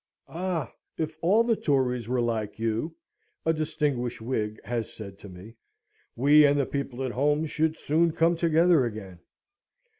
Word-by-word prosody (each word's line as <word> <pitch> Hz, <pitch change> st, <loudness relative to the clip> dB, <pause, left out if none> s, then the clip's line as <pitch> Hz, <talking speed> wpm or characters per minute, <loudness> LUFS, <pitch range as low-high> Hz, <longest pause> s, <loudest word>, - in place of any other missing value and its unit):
"Ah! 170 Hz, -6 st, -3 dB, 0.2 s
if 155 Hz, -1 st, -3 dB
all 200 Hz, +7 st, +4 dB
the 230 Hz, -1 st, +2 dB
Tories 125 Hz, -, 0 dB
were 125 Hz, -1 st, +1 dB
like 115 Hz, -3 st, -2 dB
you," 115 Hz, +8 st, -2 dB, 0.5 s
a 160 Hz, -, +3 dB
distinguished 150 Hz, -6 st, -2 dB
Whig 110 Hz, -2 st, -3 dB
has 115 Hz, -2 st, -3 dB
said 100 Hz, -3 st, -10 dB
to 100 Hz, -, -11 dB
me, 95 Hz, +5 st, -12 dB, 0.6 s
"we 145 Hz, +4 st, +6 dB
and 145 Hz, 0 st, +4 dB
the 140 Hz, -, +2 dB
people 135 Hz, -2 st, -4 dB
at 130 Hz, -, -2 dB
home 145 Hz, +5 st, +1 dB
should 160 Hz, +1 st, -1 dB
soon 165 Hz, +3 st, +2 dB
come 165 Hz, +1 st, +2 dB
together 165 Hz, -2 st, +3 dB
again." 105 Hz, -6 st, -6 dB
140 Hz, 155 wpm, -27 LUFS, 115-160 Hz, 0.6 s, we